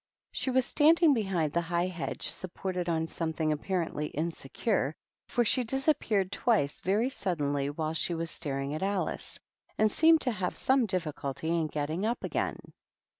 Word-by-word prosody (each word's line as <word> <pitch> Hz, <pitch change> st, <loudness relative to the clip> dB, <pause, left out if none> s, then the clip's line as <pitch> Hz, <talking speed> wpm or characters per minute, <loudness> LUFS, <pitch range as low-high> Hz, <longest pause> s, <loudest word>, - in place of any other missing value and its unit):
She -, -, -2 dB
was 260 Hz, -1 st, +3 dB
standing 315 Hz, +2 st, +5 dB
behind 190 Hz, -, 0 dB
the 170 Hz, -, +2 dB
high 170 Hz, +1 st, 0 dB
hedge, 180 Hz, -2 st, -3 dB
supported 180 Hz, -1 st, -3 dB
on 160 Hz, -1 st, +1 dB
something 160 Hz, -1 st, -1 dB
apparently 160 Hz, -1 st, -1 dB
insecure, 160 Hz, -, -1 dB, 0.3 s
for 240 Hz, -1 st, +1 dB
she 250 Hz, +3 st, +3 dB
disap 270 Hz, +5 st, +1 dB
peared 195 Hz, -4 st, 0 dB
twice 200 Hz, -9 st, +1 dB
very 215 Hz, +7 st, +1 dB
suddenly 145 Hz, -, -1 dB
while 155 Hz, +2 st, -2 dB
she 170 Hz, +2 st, 0 dB
was 165 Hz, -1 st, -3 dB
staring 140 Hz, -2 st, -3 dB
at 155 Hz, -, -3 dB
Alice, 195 Hz, 0 st, -1 dB, 0.4 s
and 215 Hz, 0 st, +3 dB
seemed 320 Hz, +4 st, +5 dB
to 250 Hz, -, +1 dB
have 185 Hz, -4 st, -2 dB
some 260 Hz, -3 st, +3 dB
difficulty 160 Hz, -5 st, -3 dB
in 165 Hz, -2 st, +1 dB
getting 155 Hz, +5 st, -2 dB
up 235 Hz, +3 st, -1 dB
again. -, -, -1 dB
180 Hz, 160 wpm, -30 LUFS, 155-220 Hz, 0.4 s, standing